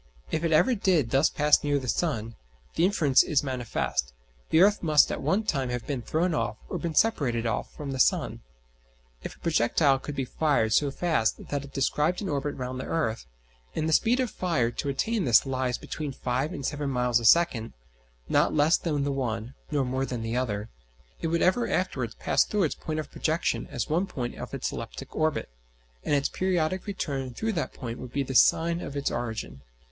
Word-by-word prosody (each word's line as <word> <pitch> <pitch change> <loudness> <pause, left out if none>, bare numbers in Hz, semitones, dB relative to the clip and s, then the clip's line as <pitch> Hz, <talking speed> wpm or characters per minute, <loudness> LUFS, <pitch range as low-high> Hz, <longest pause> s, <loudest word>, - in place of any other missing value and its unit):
If 160 - -1
it 165 - +1
ever 235 +11 +4
did 180 - +1
thus 135 +3 +4
pass 150 0 +3
near 145 -1 +1
the 130 -2 -4
sun, 115 -4 -1 0.4
the 165 - +3
inference 155 -9 +4
is 145 -2 +1
manifest 120 - -2 0.4
the 160 - +4
earth 205 +2 +5
must 150 -3 +4
at - - -3
one 205 +4 +1
time 135 -11 -1
have 125 -1 -3
been 140 -4 -3
thrown 165 +7 0
off, 110 -6 -1
or - - -3
been 165 -3 -3
separated 135 - +2
off, 110 -2 -2
from 145 -2 -5
the 135 - -4
sun. - - +2 0.8
If - - -7
a - - -26
projectile 140 -2 +2
could 145 +1 -6
be 135 -1 -1
fired 125 -6 +1
so 145 +4 +3
fast 145 -7 -1
that 145 -1 -2
it 140 - -11
described 150 +5 0
an 200 - -3
orbit 145 0 -2
round 130 0 -5
the - - -4
earth 115 - -2 0.5
and 155 - 0
the 160 - +1
speed 240 +10 +3
of 255 -3 0
fire 160 -10 0
to 140 - -3
attain 205 +9 0
this 120 0 +5
lies 130 -2 -1
between 150 -3 -5
five 130 +4 -2
and 140 - -5
seven 145 0 -2
miles 125 -2 +2
a - - -7
second 120 -5 +4 0.5
(not - - +2
less 155 +2 +4
than 150 -4 -1
the 140 - 0
one, 120 -3 -3 0.2
nor 145 -3 0
more 130 +1 -1
than 120 -3 -4
the 115 +1 -2
other) 110 -4 -2 0.5
it - - -1
would 170 +1 +1
ever 210 +7 +3
afterwards 130 -11 -1
pass - - +2
through 210 -2 0
its 155 - +1
point 155 -1 -4
of 150 - -6
projection 160 +2 -1
as 125 -6 -3
one 175 +6 0
point 125 -8 -4
of - - -7
its - - -2
elliptic - - -8
orbit; 155 -1 0 0.6
and 145 - +1
its 140 -1 +2
periodic 185 0 -1
return 135 -10 -3
through 220 0 -1
that 165 - -2
point 120 -3 -6
would 125 - -8
be 140 - 0
the 135 - -5
sign 170 +6 +4
of 140 -3 -6
its 140 - -1
origin. 110 - -4
140 Hz, 205 wpm, -27 LUFS, 125-165 Hz, 0.8 s, earth